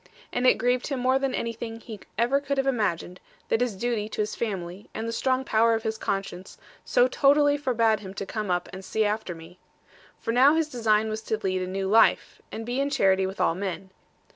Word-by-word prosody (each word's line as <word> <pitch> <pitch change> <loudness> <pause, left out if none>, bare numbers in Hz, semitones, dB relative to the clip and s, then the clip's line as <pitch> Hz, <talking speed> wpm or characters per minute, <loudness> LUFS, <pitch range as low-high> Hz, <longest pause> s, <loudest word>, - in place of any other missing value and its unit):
And 250 +1 +2
it - - +5
grieved 245 +2 0
him 275 -3 -2
more 260 +2 +2
than 270 -1 -1
anything 230 0 -4
he 220 -2 -9 0.2
ever 240 +5 +2
could 280 0 -2
have 270 - +1
imagined, 205 -8 -1 0.3
that 225 - +1
his 245 -5 0
duty 220 0 -2
to 215 - -2
his 210 - -5
family, 190 -3 -5
and 220 +1 -3
the - - -2
strong 260 +3 0
power 230 0 +3
of 225 - -3
his 220 -1 -3
conscience, 195 -2 -4 0.3
so - - +3
totally 290 - +4
forbade 230 -6 +1
him 195 -2 -9
to 195 - -4
come 210 0 -4
up 180 0 0
and 190 +1 -8
see 215 +3 0
after 210 -4 -2
me. 165 +2 -14 0.6
For 230 - -3
now 265 +6 +5
his 320 -1 0
design 220 -4 +1
was 215 0 -4
to 220 0 -2
lead 185 -1 0
a 185 - -3
new 190 +1 -3
life, 220 +3 +3
and 225 - -6
be 245 +3 -2
in 280 - 0
charity 190 -7 +2
with 190 - -7
all - - +3
men. 190 +1 -5
220 Hz, 220 wpm, -26 LUFS, 195-250 Hz, 0.6 s, it